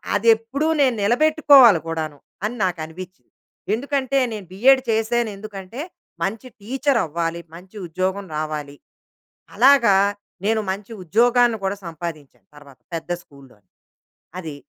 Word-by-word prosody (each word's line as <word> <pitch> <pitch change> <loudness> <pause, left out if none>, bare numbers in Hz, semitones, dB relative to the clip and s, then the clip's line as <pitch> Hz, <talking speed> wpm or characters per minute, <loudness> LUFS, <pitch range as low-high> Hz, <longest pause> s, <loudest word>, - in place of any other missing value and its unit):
అదెప్పుడూ 230 +7 +2
నేను 260 -3 +3
నిలబెట్టుకోవాలి 270 - +6
కూడాను. 160 -2 -4 0.3
అని 215 +3 -2
నాకు 180 -2 -1
అనిపించింది. 180 +3 -11 0.4
ఎందుకంటే 275 +2 -1 0.2
నేను 210 -3 -7
బిఎడ్ 260 +8 +4
చేశానెందుకంటే 220 -1 -2 0.4
మంచి 220 +7 -3
టీచర్ 265 +4 0
అవ్వాలి. 165 +1 -3
మంచి 185 +4 -14
ఉద్యోగం 185 +4 -2
రావాలి. 150 -2 -4 0.8
అలాగా 240 -2 +5 0.5
నేను 220 +1 +2
మంచి 200 +3 -6
ఉద్యోగాన్ని 235 +5 +3
గూడా 195 +1 -1
సంపాదించాను, 160 -3 -8
తర్వాత 140 -3 -16 0.2
పెద్ద 165 +1 -6
స్కూల్‌లోని 130 -9 -20 0.7
అది. 160 -5 -6
200 Hz, 110 wpm, -21 LUFS, 165-240 Hz, 0.8 s, నిలబెట్టుకోవాలి